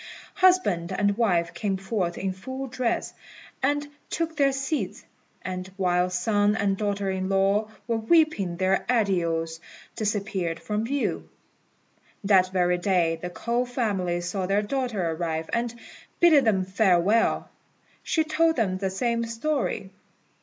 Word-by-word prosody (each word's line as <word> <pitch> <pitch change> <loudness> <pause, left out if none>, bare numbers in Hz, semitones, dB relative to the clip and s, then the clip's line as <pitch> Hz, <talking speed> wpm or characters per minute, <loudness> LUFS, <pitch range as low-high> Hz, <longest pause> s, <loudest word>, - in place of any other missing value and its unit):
Husband 360 - +3
and 205 0 +1
wife 175 -7 +1
came 190 +2 -1
forth 190 -3 -2
in 190 0 -2
full 260 +8 -6
dress, 250 -2 -2 0.5
and 290 +2 +1 0.2
took 330 -1 -2
their 280 -2 +3
seats, 270 +3 -3 0.4
and, 185 0 -5
while 180 -1 +2
son 205 +3 +1
and 200 -2 +1
daughter 200 -1 -1
in 190 0 -2
law 195 +2 +2 0.2
were 230 -1 +1
weeping 225 - +2
their 190 +1 +1
adieus, 170 -8 0 0.4
disappeared 200 -5 -2
from 210 +1 -2
view. 280 +3 -2 0.9
That 190 -2 +4
very 180 -1 +2
day 175 -3 +1
the 180 - -4
K'ou 235 +7 -1
family 195 -8 -1
saw 185 +1 -3
their 200 +2 +2
daughter 215 -7 -1
arrive, 160 -1 -3
and, 235 0 0 0.5
bidding 310 -6 +6
them 195 -4 +2
farewell, 190 +2 +2 0.5
she 320 - +1
told 320 +1 +2
them 190 -6 0
the 195 -1 -1
same 235 +4 -1
story. 230 -4 -2
200 Hz, 135 wpm, -26 LUFS, 185-240 Hz, 0.9 s, bidding